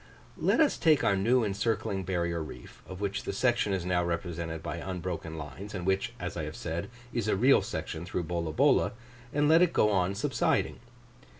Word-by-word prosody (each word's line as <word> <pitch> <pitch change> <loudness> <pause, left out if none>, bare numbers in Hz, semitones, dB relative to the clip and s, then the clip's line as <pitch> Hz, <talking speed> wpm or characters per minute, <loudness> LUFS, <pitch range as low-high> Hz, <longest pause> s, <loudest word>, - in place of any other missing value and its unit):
Let - - +2
us 310 -3 +3
take 155 -5 +4
our 100 - +3
new 115 +6 +3
encircling 105 -1 -1
barrier 85 -2 -1
reef, 60 -6 -10
of 95 +1 -8
which 100 -1 -1
the - - -3
section 110 0 +1
is 95 -3 -1
now 90 -1 +1
represented 85 -1 -3
by 85 0 -4
unbroken 85 -2 -4
lines, 80 +8 -7
and 90 -2 -4
which, 95 +6 0
as 90 0 -4
I 80 - -3
have 75 - -6
said, 85 +4 -4 0.2
is 115 -3 -1
a 105 - +2
real 130 +8 +5
section 80 - -4
through 90 0 -3
Bolabola, 85 -2 +2 0.4
and 145 0 +2
let 160 +2 +6
it 180 -2 +4
go 105 - +4
on 95 -1 +1
subsiding. 100 - 0
95 Hz, 190 wpm, -29 LUFS, 85-110 Hz, 0.4 s, let